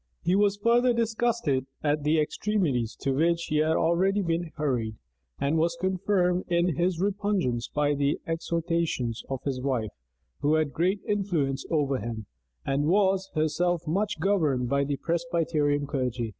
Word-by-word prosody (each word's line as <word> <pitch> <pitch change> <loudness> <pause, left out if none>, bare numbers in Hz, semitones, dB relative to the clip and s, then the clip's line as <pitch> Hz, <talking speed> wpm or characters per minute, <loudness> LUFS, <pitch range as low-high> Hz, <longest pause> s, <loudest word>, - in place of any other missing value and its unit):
He 180 - +2
was 205 0 +3
further 240 +3 +3
disgusted 225 - 0 0.2
at 150 0 +1
the 155 +2 +2
extremities 150 - 0
into 135 -1 -1
which 170 +3 +2
he 150 - +1
had 155 +1 +2
already 190 +4 +2
been 170 0 -1
hurried; 125 -8 -1 0.4
and 145 +3 +1
was 170 +1 +1
confirmed 185 -1 +1
in 175 -2 +1
his 175 +1 0
repugnance 195 - 0
by 145 0 +1
the 140 0 0
exhortations 165 -7 -1
of 135 -2 -4
his 130 -3 -2
wife, 125 -6 -1 0.5
who 150 +2 +2
had 155 -3 0
great 185 +7 +1
influence 170 -10 -1
over 140 -4 +1
him, 110 0 -5 0.4
and 140 +2 0
was 190 +1 +2
herself 165 +3 0
much 195 +6 -1
governed 155 -11 +1
by 140 +1 +2
the 140 0 -2
Presbyterian 165 -4 0
clergy. 125 -5 -2
160 Hz, 150 wpm, -27 LUFS, 140-185 Hz, 0.5 s, was